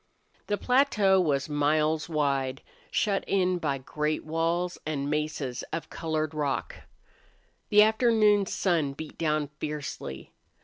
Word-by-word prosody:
The 205 - 0
plateau 215 -8 +3
was 140 -5 0
miles 150 +2 +1
wide, 140 -4 0 0.3
shut 200 -3 +1
in 185 -2 +1
by 145 -5 -1
great 150 +3 -2
walls 165 +3 -1
and 145 -2 -2
mesas 150 -4 -2
of 165 - -5
colored 155 -1 -2
rock. 145 -3 -2 1.0
The 210 0 +7
afternoon 215 -3 +3
sun 165 -9 0
beat 155 +2 -9
down 155 -3 0
fiercely. 145 - -6
155 Hz, 120 wpm, -28 LUFS, 145-190 Hz, 1.0 s, The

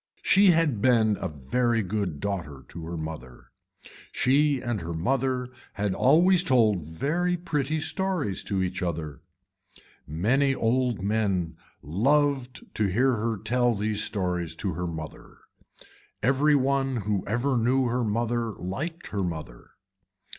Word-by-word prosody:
She 200 +1 +5
had 160 - +3
been 110 -4 +4
a 95 - -1
very 115 - 0
good 95 -6 -3
daughter 85 -8 -4
to 85 -1 -8
her 85 0 -5
mother. 80 -6 -8 0.6
She 140 +2 +2
and 120 -5 -3
her 85 0 -5
mother 130 +7 0 0.2
had 100 -1 -1
always 170 - +4
told 110 - +3
very 155 - -1
pretty 155 -3 -1
stories 160 - -1
to 95 -2 -1
each 90 +1 -3
other. 80 -5 -4 0.9
Many 125 - +1
old 120 -3 0
men 100 -5 0 0.3
loved 130 - +1
to 105 - +1
hear 125 +8 +2
her 115 0 -2
tell 120 +3 +1
these 105 +1 0
stories 90 -6 -1
to 95 +1 -3
her 90 +2 -3
mother. 80 -2 -8 0.9
Every 140 +5 +3
one 135 -1 +1
who 105 -3 0
ever 120 +5 0
knew 125 +3 +2
her 120 +1 0
mother 115 +1 -1
liked 155 - -5
her 100 - -2
mother. 85 -4 -6
115 Hz, 135 wpm, -26 LUFS, 90-135 Hz, 0.9 s, She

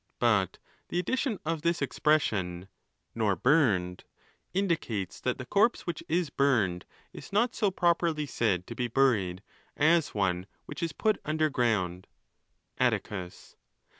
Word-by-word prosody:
But 105 -6 +2 0.3
the - - -3
addition 240 - 0
of 160 -1 -1
this 170 +1 +1
expression, 100 - 0 0.4
"nor 110 -4 +1
burned," 105 - +2 0.5
indicates, 165 - -2
that 125 - -1
the 130 - -7
corpse 210 - +2
which 170 -3 -4
is 170 -3 0
burned 110 -12 +1 0.3
is - - -10
not.so 215 0 +2
properly 170 -4 +1
said 100 -9 0
to 115 - -7
be 120 +1 -2
buried 105 -8 +1 0.3
as 160 -1 +3
one 95 -2 0 0.2
which - - -8
is 165 -1 -1
put 215 +6 0
under 155 0 0
ground.. 100 -8 0 0.7
Atticus. 90 -3 -2
130 Hz, 130 wpm, -29 LUFS, -, 0.7 s, as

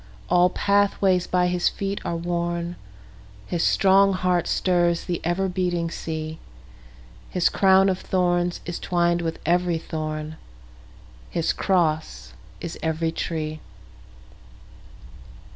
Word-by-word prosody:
All 180 0 +5
pathways 200 -2 +2
by 180 -1 +2
his 180 0 +1
feet 195 0 -4
are 170 - -2
worn, 170 0 -2 0.7
His 170 - -2
strong 195 +2 +4
heart 180 -2 +1
stirs 175 -2 +1
the 175 -2 -3
ever 175 +3 0
beating 175 -2 -1
sea, 160 -1 -5 0.9
His 180 -2 +2
crown 190 0 +4
of 190 -1 0
thorns 175 -1 0
is 175 -1 -4
twined 175 -1 +1
with 165 -1 -3
every 175 0 +2
thorn, 155 -1 -5 0.9
His 165 - 0
cross 155 - 0 0.3
is 170 - -6
every 160 0 -1
tree. 155 -1 -3
175 Hz, 110 wpm, -24 LUFS, 165-180 Hz, 0.9 s, All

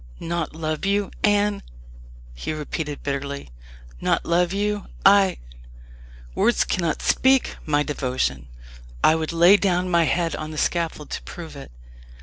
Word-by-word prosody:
"Not 170 -2 -3
love 155 -1 -3
you, 200 0 0
Anne!" 205 0 +2 0.7
he - - -4
repeated 150 -1 -5
bitterly; 140 - -4 0.5
"not - - +1
love 175 +1 +2
you 205 +1 -1 0.2
I 195 -1 +6 1.0
Words 235 - +2
cannot 170 -4 -1
speak 265 0 +3
my 150 -1 +2
devotion. 125 - -2 0.6
I - - +6
would 160 0 -2
lay 170 +4 +6
down 180 -2 0
my 170 -1 +4
head 170 0 0
on 155 - -5
the 155 - -7
scaffold 165 -2 -1
to - - -4
prove 160 -4 -9
it. 140 - -10
170 Hz, 135 wpm, -23 LUFS, 150-195 Hz, 1.0 s, I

